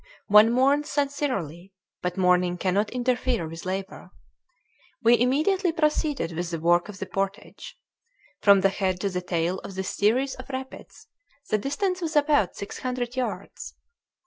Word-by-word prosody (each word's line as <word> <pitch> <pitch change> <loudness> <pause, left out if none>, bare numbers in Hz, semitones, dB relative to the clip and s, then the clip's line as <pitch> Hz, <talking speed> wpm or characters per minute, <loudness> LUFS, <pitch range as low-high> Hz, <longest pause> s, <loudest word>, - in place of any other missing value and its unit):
One 210 +2 +7
mourns 275 +4 +2
sincerely, 255 - -2 0.3
but 180 +1 -3
mourning 180 -1 +2
cannot 195 +3 0
interfere 245 -5 -1
with 165 +3 -8
labor. 190 +1 -5 0.9
We 235 0 +5
immediately 315 - +2
proceeded 300 - 0
with 170 +1 -4
the 165 -1 -4
work 175 +4 +2
of 205 - -8
the - - -5
portage. 195 +2 -5 0.6
From 200 -2 +6
the 195 - +4
head 190 -2 -1
to 200 - -1
the 180 0 -2
tail 175 +1 -1
of 195 - -9
this 190 0 -3
series 250 +7 +2
of 255 +1 -11
rapids 265 +10 -8 0.5
the 215 - +2
distance 365 - -2
was 325 -2 -3
about 290 - +3
six 200 - -7
hundred 250 -1 -3
yards. 255 -1 -5
210 Hz, 150 wpm, -25 LUFS, 185-275 Hz, 0.9 s, One